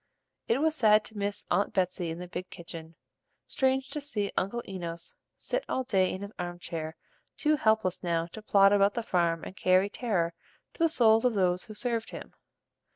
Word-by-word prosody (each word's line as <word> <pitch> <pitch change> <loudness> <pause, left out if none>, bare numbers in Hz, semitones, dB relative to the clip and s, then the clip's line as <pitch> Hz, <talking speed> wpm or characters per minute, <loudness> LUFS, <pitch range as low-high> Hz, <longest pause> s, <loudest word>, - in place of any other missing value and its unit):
It 230 - +2
was 315 0 +3
sad 215 -7 +4
to 220 - -12
miss 205 0 -2
Aunt 200 +3 +1
Betsey 180 -2 0
in 165 - -4
the 180 +1 -7
big 180 +1 -6
kitchen, 165 -1 -9 0.5
strange 265 -1 0
to 300 - -4
see 210 -9 -2
Uncle 235 +6 -1
Enos 170 -3 -6 0.2
sit - - -2
all 260 - 0
day 190 -7 +2
in 190 - -5
his 200 - -7
arm 175 0 -4
chair 165 -2 -5 0.4
too 305 0 +3
helpless 220 - +1
now 170 -2 0
to 220 - -8
plod 200 -1 +5
about 200 0 +4
the 235 - -1
farm 170 -5 +1
and - - -8
carry 185 +2 +3
terror 185 -10 -1 0.4
to - - -21
the 330 0 +4
souls 225 -6 +4
of 250 -3 +2
those 180 +1 +1
who 215 -2 -10
served 230 -1 -1
him. - - -9
200 Hz, 195 wpm, -29 LUFS, 180-230 Hz, 0.5 s, plod